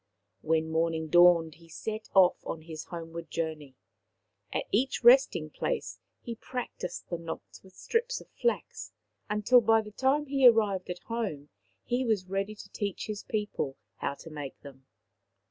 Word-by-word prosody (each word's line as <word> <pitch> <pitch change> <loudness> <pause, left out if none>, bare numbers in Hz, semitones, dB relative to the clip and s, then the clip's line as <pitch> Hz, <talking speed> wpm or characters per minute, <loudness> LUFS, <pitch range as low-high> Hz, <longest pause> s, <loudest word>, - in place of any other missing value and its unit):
When 160 0 +1
morning 160 -1 0
dawned 175 -1 +6
he 165 - -17
set 215 +6 -5
off 185 -2 +5
on 160 - -5
his 160 -2 -7
home 165 -2 -7
ward 165 -1 -7
journey. 155 -5 -4 0.8
At - - -1
each 250 +4 +1
resting 240 - +6
place - - -3 0.2
he 235 - -4
practised 235 -6 -6
the 170 - -2
knots 165 -1 -8
with 190 -1 -19
strips 485 +1 -1
of - - -15
flax, 475 - -2 0.4
until 210 +4 +5
by 225 0 +4
the 210 - -10
time 270 +6 +1
he 270 -2 +5
arrived 210 -6 +3
at 180 0 -5
home 200 -12 -4 0.3
he 245 +1 0
was 215 -6 +1
ready 195 +3 -2
to 195 - -12
teach 200 -3 -3
his 210 -1 -5
people 210 -10 -3 0.2
how 140 - -2
to 165 - -12
make 145 -3 -7
them. 135 -2 -13
190 Hz, 160 wpm, -29 LUFS, 160-225 Hz, 0.8 s, dawned